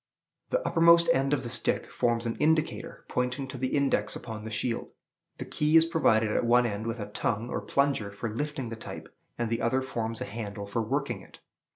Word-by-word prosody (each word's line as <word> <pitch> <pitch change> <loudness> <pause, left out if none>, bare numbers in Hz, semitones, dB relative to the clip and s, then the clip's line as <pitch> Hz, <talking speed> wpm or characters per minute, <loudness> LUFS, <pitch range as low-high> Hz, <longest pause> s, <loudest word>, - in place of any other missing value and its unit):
The - - 0
uppermost 170 0 +6
end 135 +1 +1
of 140 -3 +1
the 120 - -5
stick - - +1
forms 120 -1 0
an 115 - -1
indicator, 155 0 0
pointing 125 +2 -1
to 130 - -6
the 130 - 0
index 135 -7 +1
upon 110 -2 -7
the - - -4
shield. 115 +2 -2 0.4
The - - -5
key 150 +2 +3
is 165 - +6
provided 115 -10 +3
at - - +1
one 120 +1 +4
end 110 0 -3
with 115 +1 -3
a 105 -1 -6
tongue, 115 +3 -2
or - - -2
plunger, 140 -7 +1
for 100 +3 -5
lifting 135 +2 -3
the 115 - -5
type, 110 - -9 0.2
and 120 - -1
the 115 +1 -1
other 130 +3 +1
forms 115 -3 -3
a - - -3
handle 100 -1 -6
for 100 +3 -1
working 135 +6 -2
it. - - -16
120 Hz, 210 wpm, -28 LUFS, 110-140 Hz, 0.4 s, uppermost